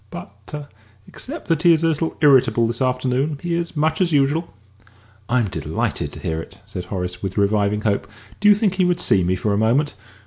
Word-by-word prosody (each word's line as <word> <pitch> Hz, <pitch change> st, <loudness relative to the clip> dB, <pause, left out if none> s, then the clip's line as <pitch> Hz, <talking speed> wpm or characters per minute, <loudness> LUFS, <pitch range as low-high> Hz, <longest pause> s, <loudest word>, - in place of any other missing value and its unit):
But 100 Hz, -, -9 dB, 0.4 s
except 300 Hz, +5 st, -7 dB
that 165 Hz, -2 st, +2 dB
he 170 Hz, -1 st, +6 dB
is 160 Hz, -, -3 dB
a -, -, +4 dB
little 160 Hz, +1 st, -2 dB
irritable 125 Hz, -5 st, +5 dB
this 115 Hz, +2 st, -3 dB
afternoon 130 Hz, +3 st, 0 dB
he 175 Hz, +2 st, -3 dB
is 170 Hz, 0 st, -2 dB
much 160 Hz, +3 st, +1 dB
as 175 Hz, -2 st, +2 dB
usual." 145 Hz, +3 st, +1 dB, 0.8 s
"I'm 120 Hz, -3 st, +2 dB
delighted -, -, -3 dB
to -, -, -7 dB
hear 80 Hz, 0 st, -3 dB
it," -, -, -12 dB
said 90 Hz, -, -6 dB
Horace, 90 Hz, -1 st, -4 dB
with 95 Hz, 0 st, -4 dB
reviving 100 Hz, 0 st, +1 dB
hope. 105 Hz, -2 st, 0 dB, 0.3 s
"Do 205 Hz, -, +5 dB
you 205 Hz, -, +8 dB
think 205 Hz, -2 st, +1 dB
he 190 Hz, -1 st, +1 dB
would 175 Hz, -1 st, +1 dB
see 95 Hz, -, +3 dB
me 90 Hz, +2 st, +1 dB
for 100 Hz, +3 st, -1 dB
a 100 Hz, -, +1 dB
moment?" 125 Hz, +7 st, +2 dB
130 Hz, 205 wpm, -21 LUFS, 100-165 Hz, 0.8 s, you